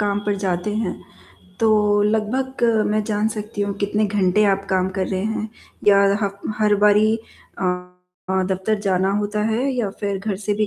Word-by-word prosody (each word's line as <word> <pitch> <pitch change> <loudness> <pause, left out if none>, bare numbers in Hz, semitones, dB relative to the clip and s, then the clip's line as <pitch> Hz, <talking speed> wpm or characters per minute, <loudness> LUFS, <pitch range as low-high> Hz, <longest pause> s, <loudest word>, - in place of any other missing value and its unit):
काम 205 -1 0
पर 205 -1 +1
जाते 190 +1 -2
हैं, 215 -4 -1 0.7
तो 210 -2 +3
लगभग 235 +5 0 0.3
मैं 215 0 +1
जान 210 0 0
सकती 210 -1 -6
हूँ 200 0 -2
कितने 210 +1 0
घंटे 205 0 +2
आप 195 0 -2
काम 185 0 +2
कर 190 - 0
रहे 190 0 -2
हैं 220 0 -2 0.4
या 200 - +7 0.3
हफ 200 0 -4 0.2
हर 210 -1 +4
बारी 210 +1 +5 0.5
अ, - - -2 0.8
दफ़्तर 190 +3 -1
जाना 190 -1 +1
होता 210 0 -1
है 250 +5 0
या 235 -5 -1
फिर 200 -1 -1
घर 200 0 -3
से 205 - +1
भी 215 +1 0
205 Hz, 175 wpm, -21 LUFS, 195-215 Hz, 0.8 s, या